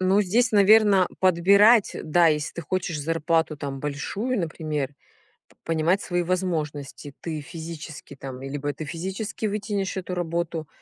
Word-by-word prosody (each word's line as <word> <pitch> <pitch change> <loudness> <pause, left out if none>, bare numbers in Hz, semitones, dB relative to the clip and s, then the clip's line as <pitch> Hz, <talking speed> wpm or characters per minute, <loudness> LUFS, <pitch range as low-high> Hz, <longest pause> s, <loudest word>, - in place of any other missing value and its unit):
Ну 190 +2 +3
здесь, 225 +5 +2
наверно, 205 -2 +6
подбирать, 200 +5 +5
да, 170 +2 +4
если 150 -2 +1
ты 170 - -5
хочешь 170 -1 -2
зарплату 165 0 0
там 140 -1 -5
большую, 200 - -2
например, 155 -4 -3 0.6
п - - -26
понимать 165 +4 +1
свои 175 -1 -1
возможности. 155 -6 -3
Ты 160 -3 -4
физически 160 -1 -8
там, 135 -1 -8
либо 145 +2 -3
ты 155 +3 -7
физически 190 +8 -4
вытянешь 200 -2 -2
эту 180 -1 -4
работу, 170 -2 -3
170 Hz, 140 wpm, -25 LUFS, 150-190 Hz, 0.6 s, наверно